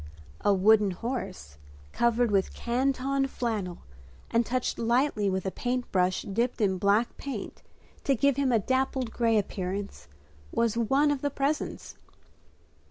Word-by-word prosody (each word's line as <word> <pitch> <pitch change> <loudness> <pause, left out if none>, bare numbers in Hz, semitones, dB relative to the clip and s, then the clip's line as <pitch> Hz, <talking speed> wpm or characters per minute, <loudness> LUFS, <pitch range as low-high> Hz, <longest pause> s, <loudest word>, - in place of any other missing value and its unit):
A 205 - +4
wooden 205 +2 +5
horse, 190 - -5 0.3
covered 235 -1 +2
with 195 -2 +1
canton 270 +2 0
flannel 215 -9 -3 0.5
and 230 +1 +3
touched 250 +2 -2
lightly 235 -3 +2
with 190 0 -2
a 190 - -1
paint 250 +3 -3
brush 185 -1 +1
dipped 235 +6 -1
in 190 -4 +1
black 205 +5 +2
paint 260 -8 -6 0.4
to 275 - +3
give 280 +2 +3
him 275 -1 +1
a 235 - +4
dappled 260 +2 0
gray 230 -1 +2
appearance, 195 - -3 0.4
was 230 -2 +1
one 270 +6 +3
of 285 -2 -2
the 285 - 0
presents. 280 +2 -3
235 Hz, 140 wpm, -28 LUFS, 200-260 Hz, 0.5 s, wooden